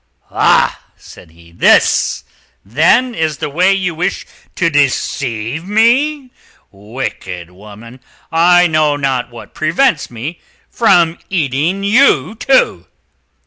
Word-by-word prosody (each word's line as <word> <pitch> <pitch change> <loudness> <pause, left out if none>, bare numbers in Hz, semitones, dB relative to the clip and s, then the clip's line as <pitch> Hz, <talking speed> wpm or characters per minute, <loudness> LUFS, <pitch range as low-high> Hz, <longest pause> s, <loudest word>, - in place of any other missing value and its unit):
"Ah!" - - +1
said 85 - -16
he, 85 +1 -20
"this, 85 - +2 0.4
then, 170 - +2
is 160 -6 -2
the 145 - -5
way 180 +6 +2
you 185 -3 -1
wish 170 +3 -3 0.3
to 175 - 0
deceive 135 -3 -1
me, 250 +7 +1 0.4
wicked 95 -5 -7
woman. 105 +6 -14 0.3
I 175 +2 +4
know 155 -3 +1
not 135 -4 -2
what 120 - -13
prevents 160 - 0
me 125 +9 -7 0.3
from 175 -7 +2
eating 165 +3 -1
you, 205 - +2
too. 260 +4 +1
155 Hz, 110 wpm, -14 LUFS, 120-190 Hz, 0.4 s, I